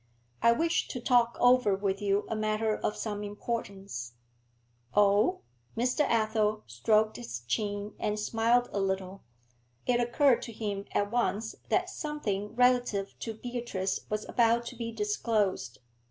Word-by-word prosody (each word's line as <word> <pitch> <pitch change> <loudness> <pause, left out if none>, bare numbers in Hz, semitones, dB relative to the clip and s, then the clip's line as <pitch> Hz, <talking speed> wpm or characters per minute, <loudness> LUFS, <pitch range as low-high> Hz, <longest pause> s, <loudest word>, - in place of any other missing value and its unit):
'I 235 - +6
wished 330 +7 0
to 250 - -4
talk 240 -1 +3
over 245 -5 +5
with 195 0 -2
you 200 0 +1
a 225 - -2
matter 215 0 0
of 210 - -2
some 210 -2 -3
importance.' 200 - -5 0.8
'Oh?' 205 0 +4 0.4
Mr. 250 +5 +1
Athel 215 -1 +1
stroked 215 - +2
his 120 0 -6
chin, 205 - -2
and 210 0 -1
smiled 230 +3 +2
a 200 - 0
little. 190 0 -2 0.6
It 245 -1 +2
occurred 245 +2 +3
to 230 - -6
him 205 -2 -4
at 205 0 0
once 220 -2 0 0.2
that - - +2
something 215 - -3
relative 245 -5 +2
to 225 -1 -5
Beatrice 235 -5 -3
was 215 0 -2
about 235 0 +3
to 245 - -7
be 230 -1 -4
disclosed. 210 - -1
215 Hz, 140 wpm, -30 LUFS, 200-235 Hz, 0.8 s, I